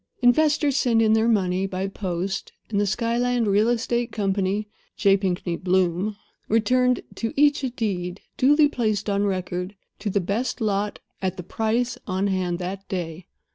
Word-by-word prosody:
Investors 290 +2 +4
sent 235 -4 +3
in 220 -1 +4
their 220 +1 +3
money 190 -4 +1
by 190 0 -3
post, 190 -1 -3 0.2
and 205 -1 +2
the 205 - +1
Skyland 240 +3 +1
Real 210 +2 +3
Estate 240 0 0
Company 200 0 0 0.3
(J. 195 -1 +5
Pinkney 180 -3 -1
Bloom) 185 +2 +1 0.3
returned 250 +3 +2
to 225 - -3
each 290 -1 +4
a 260 - 0
deed, 195 -6 -3
duly 295 +3 +5
placed 215 -6 -1
on 200 +1 +1
record, 185 0 -3 0.2
to 210 - -2
the 200 - +1
best 205 +9 -2
lot, 205 -2 0 0.2
at 190 -1 -2
the 180 - -5
price, 225 +6 -1
on 190 0 0
hand 185 -3 0
that 190 +2 -6
day. 175 -1 -4
205 Hz, 160 wpm, -24 LUFS, 185-235 Hz, 0.3 s, J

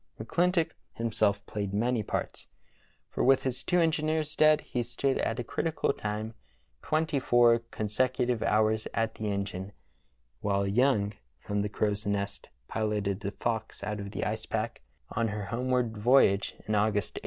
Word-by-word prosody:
McClintock 170 - +1 0.2
himself 105 -3 0
played 100 -1 -3
many 120 +2 +1
parts, 105 - -4 0.6
for - - -1
with 135 0 +5
his 130 -1 -2
two 180 - +2
engineers 155 -1 +1
dead 155 0 +5
he 125 - -3
stood 120 +3 -1
at 115 - 0
a - - -1
critical 155 +4 -1
time 110 0 -4 0.5
twenty 155 -2 0
four 120 -2 +5
consecutive 120 +2 0
hours 110 0 +2
at 115 0 0
the 110 - -4
engine, 100 0 -4 0.7
while 100 +3 +1
Young 105 -1 +2 0.3
from 105 0 -2
the 105 - -1
crow's 105 0 -1
nest 100 0 -2 0.2
piloted 105 -3 -1
the 100 -1 -3
Fox 110 +1 -3
out 105 0 -3
of 100 0 -5
the - - -3
ice 110 +1 -3
pack 110 +1 -2 0.3
on 115 - 0
her 105 -1 -3
homeward 125 +1 0
voyage, 105 -3 +4
in 110 - 0
August, 105 0 +1
1859. - - -5
110 Hz, 155 wpm, -29 LUFS, 105-125 Hz, 0.7 s, with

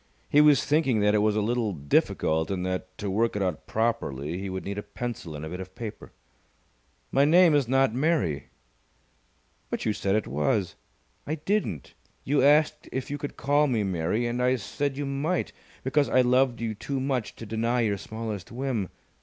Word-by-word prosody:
He 145 - +7
was 150 -2 +5
thinking 145 -7 +2
that 105 0 +3
it 105 - +4
was 105 0 +2
a 105 - +1
little 115 -2 0
difficult 80 +1 +1
and 90 -2 -2
that, 95 0 -4
to 105 - -4
work 110 +4 +1
it 100 - 0
out 90 -4 -3
properly, 85 - -1
he 100 0 -4
would 95 0 -5
need 100 +1 -3
a - - -3
pencil 105 -5 -6
and 75 +1 -6
a - - -6
bit 90 +2 -6
of 95 0 -9
paper. 110 -3 -7 1.0
"My 135 - +4
name 170 +2 +6
is 145 -4 +3
not 135 -2 +3
Mary!" 125 - 0 1.2
"But - - -3
you 110 - +2
said 100 -1 0
it 110 - +1
was." 90 - 0 0.5
"I 155 - -1
didn't. 160 - -2 0.3
You 140 +1 +2
asked 150 +3 +3
if 130 +1 -4
you 145 - -3
could 145 - -6
call 145 +2 +3
me 115 -6 +1
Mary, 95 +4 0
and 120 +1 -1
I 125 +1 +3
said 135 +6 -3
you 145 - -2
might, 140 +6 -1 0.3
because 135 0 +2
I 130 - +5
loved 125 -1 +2
you 115 -2 -1
too 135 +6 -4
much 130 -4 -2
to 115 - -9
deny 115 +3 0
your 105 -3 0
smallest 110 -4 -6
whim. 120 -6 -2
115 Hz, 195 wpm, -27 LUFS, 95-135 Hz, 1.2 s, He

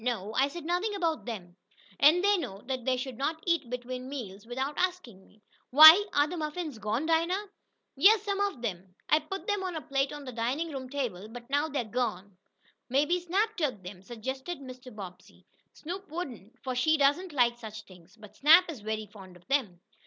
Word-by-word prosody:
"No, 220 -4 -2
I 270 +3 +3
said 310 +3 -8
nothing 360 +5 -1
about 330 -5 -1
them. 185 -7 -7 0.4
And 320 +6 +6
they 410 +1 +5
know 200 - -5
they 255 0 -1
should 255 -1 -6
not 315 +3 -2
eat 335 -8 0
between 250 +1 -5
meals 220 -6 -7
without 265 +4 -3
asking 355 - -2
me. 210 +2 -25 0.3
Why, 315 +8 +10
are 290 - +3
the 355 - -5
muffins 305 -4 -4
gone, 215 +7 -1
Dinah?" 340 +5 +1 0.5
"Yessum; 400 +5 +4
fo' 405 - +3
ob 245 -3 -8
'em. 185 -3 -5
I 305 - +5
put 385 +8 -7
'em 410 -2 0
on 370 -2 -4
a 315 - -4
plate 270 +1 -1
on 295 -1 -8
de 255 - -6
dinin' 255 +8 -2
room 260 -2 -6
table, 235 -9 -4
but 240 +1 -10
now 290 +2 +2
dey's 260 -8 -4
gone." 205 -6 -2 0.5
"Maybe 295 +7 +2
Snap 395 +6 0
took 260 - -2
them," 180 0 -9
suggested 265 - -6
Mr. 255 -1 -11
Bobbsey. 195 -5 -11 0.3
"Snoop 370 +4 -7
wouldn't, 260 - -7
for 260 -2 -2
she 310 +6 +2
doesn't 290 +6 +2
like 240 -4 +2
such 220 -1 -8
things. 185 +1 -18
But 210 -1 -14
Snap 330 +4 +6
is 285 - -9
very 215 0 -3
fond 195 -3 -14
of 175 - -24
them." 220 -11 0
265 Hz, 195 wpm, -29 LUFS, 220-325 Hz, 0.5 s, Why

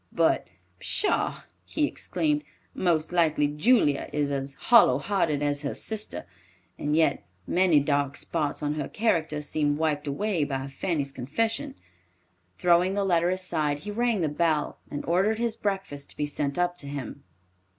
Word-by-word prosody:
"But - - +2 0.3
pshaw!" 415 - +1 0.2
he 305 - 0
exclaimed, 300 0 -1 0.3
"most 170 -2 0
likely 160 -4 +3
Julia 150 - +2
is 145 -1 0
as 135 0 -3
hollow 225 - +5
hearted 155 -3 0
as 145 -1 0
her 140 - -3
sister, 215 - -4 0.5
and 150 +1 0
yet 160 -3 +2 0.2
many 180 -4 +4
dark 140 -1 0
spots 150 -2 -2
on 145 0 0
her 150 -2 -4
character 160 -9 0
seem 145 0 0
wiped 150 -2 -1
away 170 +4 0
by 135 -1 -3
Fanny's 140 0 -2
confession." 155 - -2 0.8
Throwing 180 +2 +3
the 200 -1 +1
letter 175 -2 +2
aside 155 -6 -1
he 210 - -5
rang 230 -2 +1
the 160 - +2
bell, 155 0 0
and 145 - -5
ordered 195 +6 +2
his 230 -1 -1
breakfast 195 -10 -3
to - - -5
be 150 - 0
sent 145 -1 -2
up 175 0 0
to 140 - -4
him. 140 -1 -6
155 Hz, 155 wpm, -27 LUFS, 145-190 Hz, 0.8 s, hollow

